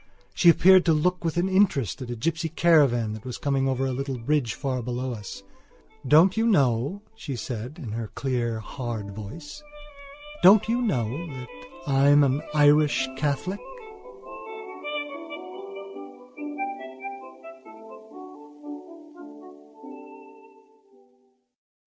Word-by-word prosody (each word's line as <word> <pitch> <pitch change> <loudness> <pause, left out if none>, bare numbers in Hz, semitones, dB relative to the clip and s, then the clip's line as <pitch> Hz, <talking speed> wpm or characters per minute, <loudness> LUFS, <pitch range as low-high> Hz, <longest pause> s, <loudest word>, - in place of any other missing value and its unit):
She 175 - +5
appeared 185 +2 +7
to 165 - +4
look 180 +4 +1
with 165 0 -1
interest 175 - +2
at 125 - -6
a 120 - -3
gypsy 165 +7 -2
caravan 135 -10 +4
that 110 0 -8
was 125 -2 -6
coming 135 -2 0
over 135 0 0
a 135 - -1
little 135 0 -3
bridge 125 -1 0
far 130 -3 -2
below 125 +1 -3
us. 100 -2 -8 0.6
"Don't 165 +6 +6
you 225 +1 +2
know," 140 - +2
she 140 -11 -6
said, 120 +3 -6
in 130 -11 -7
her 115 0 -4
clear 120 -1 -2
hard 110 -3 -5
voice, 145 - -9 0.8
"don't 200 +3 +7
you 235 +2 +1
know 140 - -1
that 130 -5 -8 0.4
I'm 145 +1 +5
an 140 +1 +1
Irish 145 -2 +4
Catholic?" 145 +8 -2
140 Hz, 105 wpm, -25 LUFS, 120-165 Hz, 0.8 s, appeared